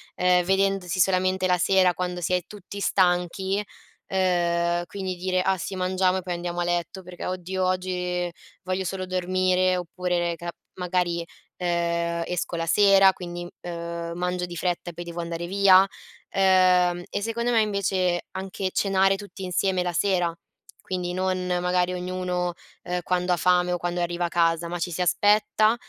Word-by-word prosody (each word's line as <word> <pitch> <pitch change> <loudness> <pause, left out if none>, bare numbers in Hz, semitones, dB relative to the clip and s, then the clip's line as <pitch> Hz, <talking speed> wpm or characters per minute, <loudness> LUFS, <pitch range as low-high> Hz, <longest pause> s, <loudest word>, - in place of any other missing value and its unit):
ehm, 180 0 +3
vedendosi 195 -1 +1
solamente 185 0 +2
la 180 -1 +3
sera 185 -1 +4
quando 180 0 -3
si 180 - -1
è 180 - +2
tutti 200 -1 -9
stanchi, 190 +1 +1 0.4
ehm, 175 -2 +1
quindi 190 -2 -4
dire: 185 +1 0
"Ah 190 0 +2
sì 190 - -5
mangiamo 185 0 +1
e - - -2
poi 180 -1 -3
andiamo 175 0 -4
a - - +1
letto 175 +2 -2
perché 180 0 -7
oddio 185 +1 -3
oggi 180 -1 -1 0.3
voglio 185 +1 -2
solo 185 0 -3
dormire", 185 0 +1
oppure 180 0 -2
ne 170 -1 0
ca 170 +1 -6 0.3
magari, 175 -1 0 0.3
ehm, 170 -1 -1
esco 175 0 -3
la 165 - -2
sera 195 +1 +6
quindi, 175 -1 -7 0.2
ehm, 170 -1 -5
mangio 180 0 -1
di 175 -1 -8
fretta 175 +1 -2
e - - -20
poi 175 - -7
devo 170 0 -7
andare 170 0 -4
via, 195 0 +6 0.4
ehm, 185 -2 +4
e - - -3
secondo 235 +2 -1
me 225 -2 +4
invece 190 -4 0
anche 190 0 -4
cenare 195 0 +2
tutti 205 -1 -9
insieme 185 0 0
la 175 - -1
sera, 175 -1 +1 0.5
quindi 180 -1 -3
non 185 0 -1
magari 180 0 +1
ognuno, 180 -1 -2 0.3
ehm, 180 0 -2
quando 180 0 +1
ha - - 0
fame 180 0 +3
o - - 0
quando 175 0 -3
arriva 175 0 -1
a - - -2
casa, 170 0 +1
ma 175 - -4
ci 175 - -1
si 175 - -3
aspetta 210 +4 +3
180 Hz, 170 wpm, -25 LUFS, 175-190 Hz, 0.5 s, sera